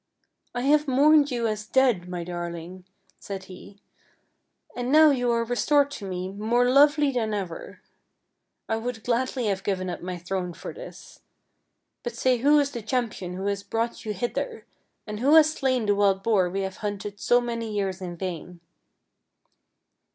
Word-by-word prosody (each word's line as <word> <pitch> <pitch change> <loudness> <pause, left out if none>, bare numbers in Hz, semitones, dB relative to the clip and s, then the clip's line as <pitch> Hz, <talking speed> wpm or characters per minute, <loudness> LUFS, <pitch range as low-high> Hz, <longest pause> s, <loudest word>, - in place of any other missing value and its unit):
" - - -55
I 245 - -1
have 295 +3 +3
mourned 290 +2 +5
you 240 -2 -1
as 215 -1 -2
dead, 240 -10 +2
my 175 -1 -4
darling," 175 +1 -6 0.3
said 195 -1 -6
he, 190 +2 -13 0.5
" - - -34
and 245 +1 -2
now 310 0 +7
you 245 -3 0
are 230 0 +1
restored 285 +4 +2
to 210 - -7
me 180 0 -3
more 225 +5 +1
lovely 290 +2 +5
than 220 -4 -1
ever. 185 -5 -6 0.9
I 225 - 0
would 225 -1 -5
gladly 250 +1 -1
have 195 -2 0
given 185 -2 -2
up - - -6
my 180 0 -5
throne 180 0 -4
for - - -8
this. - - -12 0.8
But 240 -1 -5
say 255 +1 +2
who 290 +4 +5
is 285 -1 +2
the 235 - -5
cham 240 +1 -1
pion 180 -3 -7
who 190 +1 -5
has 200 0 -1
brought 230 +3 -3
you 215 - -3
hither, 245 - -4 0.4
and 210 -1 -6
who 280 +6 +4
has 310 -1 +6
slain 260 -6 0
the 205 - +3
wild 200 -1 +2
boar 195 -5 +2
we 195 +2 -2
have 190 -1 -4
hunted 205 -1 -5
so 245 - +4
many 230 -2 -4
years 195 -3 -2
in 175 -2 -6
vain? 180 -1 -6
220 Hz, 180 wpm, -25 LUFS, 190-255 Hz, 0.9 s, now